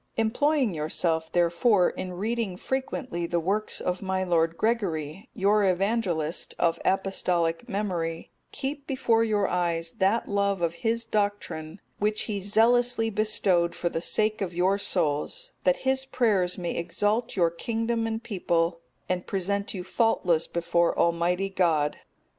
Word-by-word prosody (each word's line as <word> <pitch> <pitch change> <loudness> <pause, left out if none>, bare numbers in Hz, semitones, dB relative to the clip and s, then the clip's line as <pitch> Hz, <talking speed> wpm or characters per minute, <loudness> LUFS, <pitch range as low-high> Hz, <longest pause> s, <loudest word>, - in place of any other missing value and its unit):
Employing 250 - +2
yourself, 160 +1 -1
therefore, 175 +3 +3
in 185 -1 -6
reading 210 0 -2
frequently 255 -8 -3
the 170 0 0
works 200 +6 -1
of 180 0 -2
my 190 -1 -1
lord 165 -2 +1
Gregory, 190 -6 -1
your 205 +1 +3
Evangelist, 185 -4 0
of 165 -1 +1
apostolic 185 +1 0
memory, 175 -6 -3 0.2
keep 280 +1 -4
before 230 -4 +2
your 210 -3 +1
eyes 170 -2 -1
that 200 +5 +2
love 200 -1 +1
of 170 -1 +1
his 230 0 0
doctrine, 205 -6 -2 0.2
which 210 +1 0
he 205 -3 -3
zealously 225 +3 +3
bestowed 195 -5 +1
for 175 - -1
the 165 - -3
sake 215 +4 0
of 180 -3 -3
your 190 +3 +2
souls; 180 - -1
that - - +4
his 265 0 +2
prayers 210 -9 +1
may 175 -2 -3
exalt 210 +7 -1
your 170 -3 +3
kingdom 225 +5 -1
and 225 0 -3
people, 170 -4 0 0.3
and 180 -1 -2
present 200 +2 -2
you 180 - -4
faultless 180 -5 +1
before 170 0 +1
Almighty 175 +3 +1
God. 160 -6 +1
195 Hz, 140 wpm, -27 LUFS, 170-225 Hz, 0.3 s, that